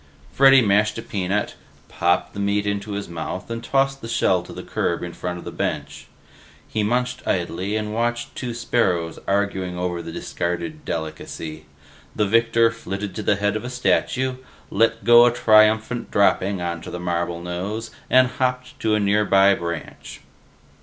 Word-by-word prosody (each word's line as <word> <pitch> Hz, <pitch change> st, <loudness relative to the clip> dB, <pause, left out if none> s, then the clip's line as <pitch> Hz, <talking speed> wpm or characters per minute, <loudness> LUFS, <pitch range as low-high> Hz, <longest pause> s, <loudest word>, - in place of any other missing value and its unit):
Freddy 135 Hz, +2 st, +7 dB
mashed 105 Hz, 0 st, +2 dB
a -, -, -4 dB
peanut, 100 Hz, +1 st, -2 dB, 0.3 s
popped 85 Hz, +1 st, 0 dB
the -, -, -6 dB
meat 100 Hz, 0 st, 0 dB
into 100 Hz, 0 st, -2 dB
his 100 Hz, 0 st, -4 dB
mouth, 85 Hz, +4 st, -6 dB
and 115 Hz, 0 st, -4 dB
tossed 135 Hz, +2 st, +1 dB
the 115 Hz, -, -6 dB
shell 95 Hz, -6 st, +2 dB
to 90 Hz, -, -12 dB
the -, -, -8 dB
curb 85 Hz, -, -2 dB
in 85 Hz, -1 st, -5 dB
front 90 Hz, 0 st, -4 dB
of 85 Hz, -, -10 dB
his -, -, -6 dB
bench. -, -, -4 dB, 0.6 s
He 110 Hz, -, -2 dB
munched 125 Hz, +4 st, 0 dB
and 95 Hz, -, +1 dB
idly 95 Hz, +5 st, -3 dB
watched 120 Hz, +3 st, -2 dB
two 120 Hz, -3 st, -4 dB
sparrows 95 Hz, -8 st, 0 dB
arguing 95 Hz, -2 st, -1 dB
over 90 Hz, -1 st, -2 dB
the 85 Hz, 0 st, -7 dB
discarded 90 Hz, -, -4 dB
delicacy; 80 Hz, 0 st, -5 dB, 0.5 s
the 105 Hz, -, +2 dB
victor 115 Hz, +2 st, +3 dB
flitted 100 Hz, -2 st, -5 dB
to 110 Hz, -, -4 dB
the 105 Hz, -, +2 dB
head 105 Hz, +1 st, 0 dB
of 110 Hz, -, -3 dB
a 125 Hz, -, -5 dB
statue, 130 Hz, +1 st, 0 dB, 0.3 s
let 115 Hz, +2 st, +2 dB
go 120 Hz, 0 st, +8 dB
a -, -, +3 dB
triumphant 110 Hz, +1 st, +3 dB
dropping 100 Hz, -2 st, +2 dB
onto 85 Hz, -1 st, -4 dB
the 90 Hz, -, -6 dB
marble 85 Hz, -1 st, -2 dB
nose, 95 Hz, +6 st, -4 dB, 0.2 s
and 130 Hz, 0 st, +6 dB
hopped 125 Hz, 0 st, -2 dB
to 110 Hz, -1 st, +1 dB
a -, -, +1 dB
nearby 100 Hz, -1 st, +4 dB
branch. 85 Hz, -3 st, -6 dB
105 Hz, 165 wpm, -22 LUFS, 90-115 Hz, 0.6 s, go